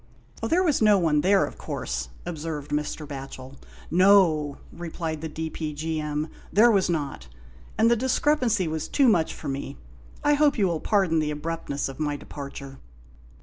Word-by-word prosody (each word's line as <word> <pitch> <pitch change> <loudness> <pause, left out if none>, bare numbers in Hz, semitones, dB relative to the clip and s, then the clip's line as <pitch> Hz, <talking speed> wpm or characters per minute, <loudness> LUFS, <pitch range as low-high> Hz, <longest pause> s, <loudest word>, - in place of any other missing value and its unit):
" - - -23
There 360 +3 +3
was 305 -9 +2
no 210 -2 +6
one 155 -5 +2
there, 195 +3 +4
of - - -10
course," 65 -1 -4 0.2
observed 155 -3 -5
Mr. 150 +1 -2
Batchel. 135 -1 -8 0.2
" - - -20
No! 160 -8 +4
" - - -21
replied 165 -2 -5
the 160 - -4
D.P.G.M., 155 -1 -3
" - - -21
there 230 +3 +6
was 195 -4 +2
not; 145 - -3 0.5
and 230 +1 +4
the - - +5
discrepancy 250 - +1
was 155 -1 -3
too 275 -3 +3
much 175 -8 +3
for - - -8
me. 140 0 -4 0.5
I 295 - +4
hope 290 -1 +3
you 205 - +3
will 170 -3 -1
pardon 190 -5 +2
the 155 -1 0
abruptness 150 -1 -3
of 135 +1 -9
my 145 -1 -1
departure." 140 -2 -9
160 Hz, 175 wpm, -25 LUFS, 145-200 Hz, 0.5 s, no